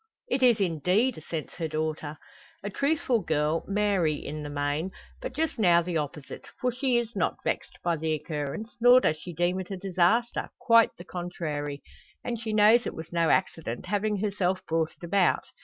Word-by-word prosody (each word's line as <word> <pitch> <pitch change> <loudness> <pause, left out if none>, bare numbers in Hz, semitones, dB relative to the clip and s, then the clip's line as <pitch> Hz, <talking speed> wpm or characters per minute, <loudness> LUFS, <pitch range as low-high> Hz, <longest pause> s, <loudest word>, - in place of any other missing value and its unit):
"It 260 - 0
is, 240 -4 +5
indeed!" 185 - +1
assents 160 0 -6
her 165 -2 -2
daughter. 155 -1 -3 0.5
A 205 - -4
truthful 280 -2 +1
girl, 155 0 0
Mary, 195 -6 +1
in 150 +1 -6
the 145 - -6
main; 145 +4 -1 0.3
but - - -6
just 315 -5 -1
now 175 -4 +5
the 175 -1 -2
opposite. 150 -1 -6
For 250 - +1
she 255 0 +1
is 235 -1 -2
not - - -1
vexed - - -3
by 170 -1 +1
the 160 +1 -1
occurrence, 155 - -4
nor 245 +1 +8
does 155 -10 +1
she 175 +3 -8
deem 175 +3 0
it 185 - -6
a 195 - -4
disaster, 195 +5 +1
quite 230 -2 +5
the 175 - -10
contrary. 155 -6 -4 0.4
And 235 -2 -3
she 225 -1 -4
knows 215 +3 +5
it - - -5
was 160 +1 -8
no 165 -1 +2
accident, 160 -10 0
having 210 0 0
herself 190 -2 -1
brought 160 -1 0
it - - -20
about. 180 +1 +2
180 Hz, 185 wpm, -27 LUFS, 155-215 Hz, 0.5 s, nor